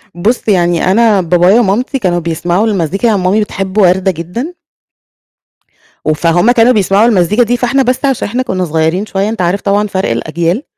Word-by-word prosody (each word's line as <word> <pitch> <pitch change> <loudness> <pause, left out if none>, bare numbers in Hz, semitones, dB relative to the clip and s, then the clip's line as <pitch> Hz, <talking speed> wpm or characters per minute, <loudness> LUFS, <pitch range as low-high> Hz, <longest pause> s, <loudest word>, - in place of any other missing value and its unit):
بُص 220 +9 -1
يعني 175 -3 +1
أنا، 215 -1 +3
بابايا 180 +5 +3
ومامتي 240 +6 -1
كانوا 180 -6 0
بيسمعوا 175 +5 -1
المزيكا 195 +1 -1
يعني، 215 -3 +1
مامي 190 +4 +1
بتحب 195 -1 -5
وردة 190 -1 +3
جدًا. 180 - -6 1.5
وفهُم 170 +7 +2
كانوا 240 0 +4
بيسمعوا 205 0 +2
المزيكا 210 +2 +2
دي، 245 +2 -1
فإحنا 265 +3 +1
بس 255 +3 -1
عشان 270 -4 -1
إحنا 245 +5 -2
كُنا 185 -7 -2
صغيرين 160 +4 -1
شوية 200 0 -2
أنت 225 -3 -4
عارف 180 +3 -1
طبعًا 205 +1 0
فرق 190 -6 -2
الأجيال 170 - -2
195 Hz, 165 wpm, -12 LUFS, 175-225 Hz, 1.5 s, كانوا